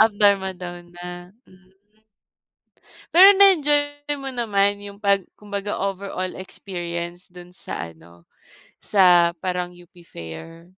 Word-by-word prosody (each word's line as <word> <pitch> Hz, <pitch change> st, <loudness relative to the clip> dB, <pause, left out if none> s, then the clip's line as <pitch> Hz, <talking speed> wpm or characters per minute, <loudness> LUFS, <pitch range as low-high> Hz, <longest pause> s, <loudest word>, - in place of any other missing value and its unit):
Up 220 Hz, -1 st, +5 dB
Dharma 195 Hz, -2 st, +2 dB
Down 175 Hz, -1 st, -9 dB
na, 175 Hz, +2 st, -9 dB
mm. 185 Hz, 0 st, -22 dB, 1.5 s
Pero 385 Hz, +3 st, +10 dB
na-enjoy 290 Hz, -5 st, +3 dB
mo 270 Hz, -, -7 dB
naman 205 Hz, -4 st, +1 dB
yung 200 Hz, 0 st, -10 dB
pag 200 Hz, -2 st, +2 dB, 0.2 s
kumbaga 205 Hz, 0 st, -4 dB
overall 195 Hz, -1 st, -3 dB
experience 175 Hz, -2 st, -6 dB
dun 180 Hz, 0 st, -13 dB
sa 85 Hz, -, -5 dB
ano, 85 Hz, +1 st, -20 dB, 0.5 s
sa 180 Hz, -4 st, +5 dB
parang 180 Hz, 0 st, -3 dB
UP 175 Hz, 0 st, -18 dB
Fair? 165 Hz, -, -10 dB
185 Hz, 115 wpm, -22 LUFS, 175-205 Hz, 1.5 s, Pero